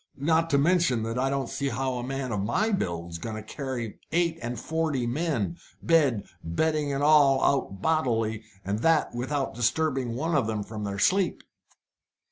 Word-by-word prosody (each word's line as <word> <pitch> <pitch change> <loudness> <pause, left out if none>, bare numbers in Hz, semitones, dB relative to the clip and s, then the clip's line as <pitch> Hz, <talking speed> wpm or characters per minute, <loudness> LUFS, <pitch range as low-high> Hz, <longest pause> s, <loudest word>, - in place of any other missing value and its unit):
Not 160 +3 +2
to 140 - +3
mention 150 -6 +3
that 115 +2 -2
I 135 +1 +1
don't 135 -2 -1
see 140 +3 -2
how 130 +2 -1
a - - -4
man 135 0 -3
of 105 - -1
my 205 - +1
build's 85 - -2
going 110 +5 -5
to 110 - -6
carry 120 -2 -5
eight 170 -1 +1
and 120 -1 -4
forty 155 -5 -1
men, 145 - -1 0.3
bed, 145 -10 +3 0.2
bedding, 150 - 0
and 140 +1 -1
all, 145 -3 +5
out 125 -9 0
bodily, 115 -9 +1 0.2
and 100 +2 -1
that 160 +4 +2
without 135 +3 -2
disturbing 125 0 0
one 160 +6 -1
of 135 -7 +2
them 110 -2 -2
from 105 -1 -5
sleep." 185 - +2
135 Hz, 170 wpm, -27 LUFS, 115-155 Hz, 0.3 s, all